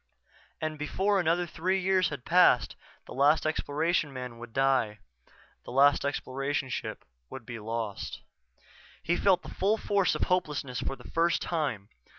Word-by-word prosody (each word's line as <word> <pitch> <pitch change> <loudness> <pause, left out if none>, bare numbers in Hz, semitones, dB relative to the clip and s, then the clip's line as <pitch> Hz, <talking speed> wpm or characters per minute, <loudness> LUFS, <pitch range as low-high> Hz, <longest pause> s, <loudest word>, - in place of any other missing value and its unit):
And 155 -1 -3
before 195 +6 +1
another 175 0 +1
three 180 +3 -1
years 185 0 +2
had 140 -4 -7
passed 175 -8 +4 0.3
the - - -10
last 145 +4 +3
Exploration 155 0 0
man 125 -3 -7
would 120 -1 -9
die, 130 -4 +1 0.7
the - - -11
last 140 +2 +4
Exploration 135 0 -2
ship - - -5 0.2
would 130 -3 -9
be 115 -1 -7
lost. 110 -2 -4 0.8
He 175 - +1
felt 190 0 +3
the - - -9
full 205 +3 +1
force 200 -3 +1
of - - 0
hopelessness 150 -8 -1
for - - -3
the 125 - -13
first 170 +1 +2
time. 140 - -2
145 Hz, 155 wpm, -29 LUFS, 130-175 Hz, 0.8 s, passed